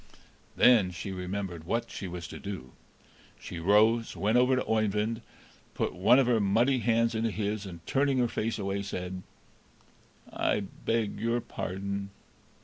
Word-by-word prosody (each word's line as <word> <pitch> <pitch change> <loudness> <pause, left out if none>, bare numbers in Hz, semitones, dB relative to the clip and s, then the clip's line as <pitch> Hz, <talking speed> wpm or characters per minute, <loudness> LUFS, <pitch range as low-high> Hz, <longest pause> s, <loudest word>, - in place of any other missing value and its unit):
Then 115 -7 +6
she 90 +3 -6
remembered 90 -2 -4
what 115 +6 -2
she 95 - -5
was 85 -1 -6
to - - -8
do; 95 -11 -7 0.7
she 85 - -7
rose, 110 +6 +3
went 110 +3 +1
over 125 +1 +5
to 130 - -1
Oeyvind, 110 +1 0 0.5
put - - -1
one 100 +8 +5
of 135 - +4
her 120 -2 +3
muddy 115 +6 +3
hands 115 0 +2
into 115 +1 0
his, 105 -1 -3
and, 85 -3 -10
turning 135 0 +1
her 125 -1 +3
face 115 0 -2
away, 100 -1 -2
said: 90 -2 -5 1.1
"I 105 - +1
beg 110 +2 -2
your 115 +2 +1
pardon!" 100 -2 -4
105 Hz, 150 wpm, -29 LUFS, 95-115 Hz, 1.1 s, Then